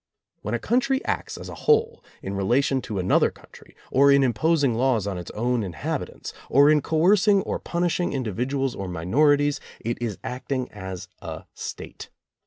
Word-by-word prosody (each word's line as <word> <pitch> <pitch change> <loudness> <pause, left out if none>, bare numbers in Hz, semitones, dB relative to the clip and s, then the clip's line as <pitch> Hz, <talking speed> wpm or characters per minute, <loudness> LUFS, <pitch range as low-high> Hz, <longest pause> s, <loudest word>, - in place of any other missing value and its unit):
When 105 +3 -2
a - - +1
country 265 - 0
acts - - -3
as - - -8
a - - -7
whole 455 +1 +1 0.2
in 95 - -4
relation 125 +7 +1
to 105 - -5
another 90 -1 +3
coutnry, - - -18 0.2
or 140 +1 +5
in 140 0 +5
imposing 135 +3 +2
laws 120 -3 +1
on 95 -3 -3
its 85 - -8
own 120 +2 0
inhabitants, 90 -5 -5 0.2
or 140 +3 +6
in 150 -1 +4
coerc 180 +8 +3
ing 200 -2 +5
or - - -3
punishing 175 0 -1
individuals 130 +2 -1
or 95 - -5
minorities, 145 - +2 0.2
it 120 +1 -4
is 110 -5 -2
act 125 +2 -6
ing 130 -2 -1
as 95 -3 -7
a - - -7
State. - - -8
130 Hz, 175 wpm, -24 LUFS, 105-155 Hz, 0.2 s, or